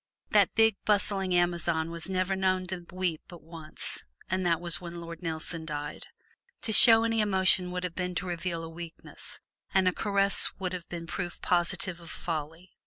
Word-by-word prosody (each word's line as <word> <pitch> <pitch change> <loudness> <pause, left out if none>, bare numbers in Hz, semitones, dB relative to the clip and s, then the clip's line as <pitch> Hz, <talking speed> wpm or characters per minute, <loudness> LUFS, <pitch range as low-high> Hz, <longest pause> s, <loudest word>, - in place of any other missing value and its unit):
This - - +5
big, 225 -2 +4
bustling 195 -3 +1
Amazon 170 -2 +1
was 170 +2 -3
never 185 0 0
known 185 -1 +1
to 175 -1 -6
weep 180 -4 -2
but 175 -2 -12
once, 160 -1 -7 0.3
and 185 0 0
that 165 -2 +2
was 175 -1 -2
when 170 -1 -7
Lord 170 0 -8
Nelson 165 0 -1
died. 150 -2 -6 0.6
To 220 - -1
show 225 0 +8
any 225 -1 +1
emotion 190 -3 +3
would 180 0 -4
have 180 -2 -3
been 180 0 -3
to 170 - -2
reveal 170 -1 -3
a - - -6
weakness, 165 0 -10 0.3
and 190 -1 +4
a 185 - +3
caress 200 0 +3
would 185 -2 -3
have 180 -2 -7
been 170 -1 -6
proof 175 +1 -5
positive 175 0 0
of 170 -1 -11
folly. 165 +3 -5
175 Hz, 180 wpm, -28 LUFS, 170-190 Hz, 0.6 s, show